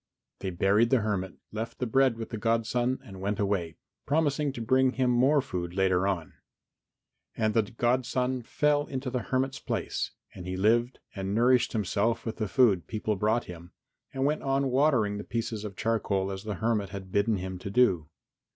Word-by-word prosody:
They 95 Hz, -, -3 dB
buried 100 Hz, +6 st, +3 dB
the 130 Hz, -4 st, +3 dB
hermit, 95 Hz, -4 st, -2 dB, 0.2 s
left 115 Hz, +2 st, -5 dB
the 125 Hz, -, -2 dB
bread 130 Hz, 0 st, +3 dB
with 115 Hz, -, -6 dB
the 110 Hz, -, -3 dB
godson 115 Hz, +3 st, +1 dB
and 95 Hz, -7 st, -11 dB
went 100 Hz, +2 st, -2 dB
away, 100 Hz, -5 st, -1 dB, 0.3 s
promising 145 Hz, -1 st, +1 dB
to 120 Hz, -, -7 dB
bring 130 Hz, +3 st, +3 dB
him 130 Hz, -2 st, +1 dB
more 135 Hz, +4 st, +4 dB
food 90 Hz, -8 st, -4 dB
later 95 Hz, -1 st, +2 dB
on. 90 Hz, -5 st, -2 dB, 1.0 s
And 110 Hz, -1 st, +1 dB
the 115 Hz, -, +4 dB
godson 125 Hz, +3 st, 0 dB
fell 145 Hz, +4 st, +1 dB
into 130 Hz, -1 st, -4 dB
the 125 Hz, -, 0 dB
hermit's 130 Hz, +1 st, 0 dB
place -, -, -2 dB, 0.2 s
and 90 Hz, -1 st, -9 dB
he 90 Hz, 0 st, -3 dB
lived 115 Hz, +5 st, +2 dB, 0.2 s
and 95 Hz, 0 st, -3 dB
nourished 125 Hz, +1 st, +3 dB
himself 110 Hz, +2 st, 0 dB
with 115 Hz, -, -4 dB
the 110 Hz, -, -1 dB
food 100 Hz, -, +3 dB
people 110 Hz, -1 st, -2 dB
brought 110 Hz, +4 st, +1 dB
him, 85 Hz, 0 st, -11 dB, 0.4 s
and 135 Hz, 0 st, -1 dB
went 150 Hz, +2 st, +1 dB
on 135 Hz, -1 st, 0 dB
watering 125 Hz, -7 st, +2 dB
the -, -, -5 dB
pieces 115 Hz, -2 st, -3 dB
of 105 Hz, -3 st, -6 dB
charcoal 100 Hz, -4 st, 0 dB
as 95 Hz, +2 st, -6 dB
the 105 Hz, -2 st, -3 dB
hermit 110 Hz, -2 st, 0 dB
had 95 Hz, -1 st, -8 dB
bidden 100 Hz, +2 st, +2 dB
him 95 Hz, 0 st, -5 dB
do. 95 Hz, -7 st, +2 dB
115 Hz, 180 wpm, -28 LUFS, 100-125 Hz, 1.0 s, more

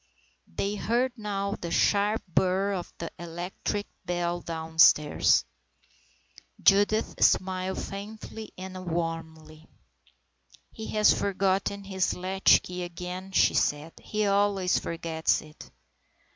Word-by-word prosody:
They 200 Hz, +1 st, -3 dB
heard 240 Hz, +5 st, 0 dB
now 200 Hz, -3 st, -3 dB
the 170 Hz, -, -4 dB
sharp 205 Hz, +5 st, +2 dB
burr 190 Hz, +3 st, +1 dB
of 180 Hz, -2 st, -5 dB
the 165 Hz, -, -6 dB
electric 175 Hz, +4 st, -4 dB, 0.2 s
bell 175 Hz, 0 st, -2 dB
downstairs. 160 Hz, -2 st, +3 dB, 1.1 s
Judith 205 Hz, +2 st, +3 dB
smiled 185 Hz, 0 st, +2 dB
faintly 215 Hz, +2 st, -7 dB
and 185 Hz, 0 st, -8 dB
wanly. 160 Hz, -1 st, -5 dB, 0.5 s
" 65 Hz, -1 st, -31 dB
He 220 Hz, -, -8 dB
has 215 Hz, 0 st, +6 dB
forgotten 195 Hz, 0 st, 0 dB
his 190 Hz, -1 st, -1 dB
latchkey 185 Hz, -1 st, +2 dB
again," 180 Hz, +2 st, -6 dB
she -, -, +4 dB
said. 150 Hz, +3 st, 0 dB
" -, -, -42 dB
He 215 Hz, 0 st, -1 dB
always 200 Hz, -2 st, +2 dB
forgets 165 Hz, -1 st, -1 dB
it." 155 Hz, 0 st, -14 dB
185 Hz, 110 wpm, -27 LUFS, 165-200 Hz, 1.1 s, has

